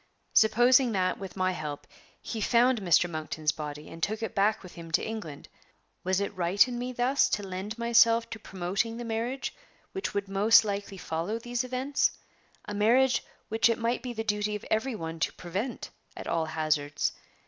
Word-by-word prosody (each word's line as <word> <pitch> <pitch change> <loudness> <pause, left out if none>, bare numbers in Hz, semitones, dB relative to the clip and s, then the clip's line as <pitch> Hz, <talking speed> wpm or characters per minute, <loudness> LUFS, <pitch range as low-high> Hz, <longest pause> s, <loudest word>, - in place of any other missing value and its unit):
Supposing 240 +3 +5
that, 185 -2 0
with 195 -1 -8
my 185 0 +2
help, 150 -5 -5 0.3
he 220 - -5
found 240 +2 +3
Mr. 175 -1 +4
Monkton's 155 -2 -2
body, 150 0 -7
and 165 - -10
took 215 +5 -1
it 220 - -3
back 205 +2 +2
with 185 - -11
him 165 -1 -10
to - - +3
England, 205 -10 -6 0.6
was 185 +1 +1
it 200 0 -3
right 185 +6 +4
in 240 -1 -4
me 250 +1 -3
thus 255 +3 +2
to 205 - -1
lend 190 +4 -5
myself 230 0 +4
to 225 - -6
promoting 195 +5 -2
the 240 - -5
marriage 230 +4 -2 0.4
which 385 - -4
would 200 0 -1
most 205 +3 +5
likely 200 -1 -4
follow 170 +5 -3
these 240 +1 -2
events 255 +3 0 0.5
a 210 - -5
marriage 240 +5 +3 0.2
which 225 0 +3
it 230 - +1
might 230 +1 -1
be 250 - -5
the 225 -2 -3
duty 210 -1 -1
of 210 - -7
every 225 +3 +1
one 165 -4 -5
to - - +1
prevent 195 +8 -5 0.3
at - - -7
all 165 -1 0
hazards? 155 -2 0
210 Hz, 185 wpm, -28 LUFS, 180-235 Hz, 0.6 s, Supposing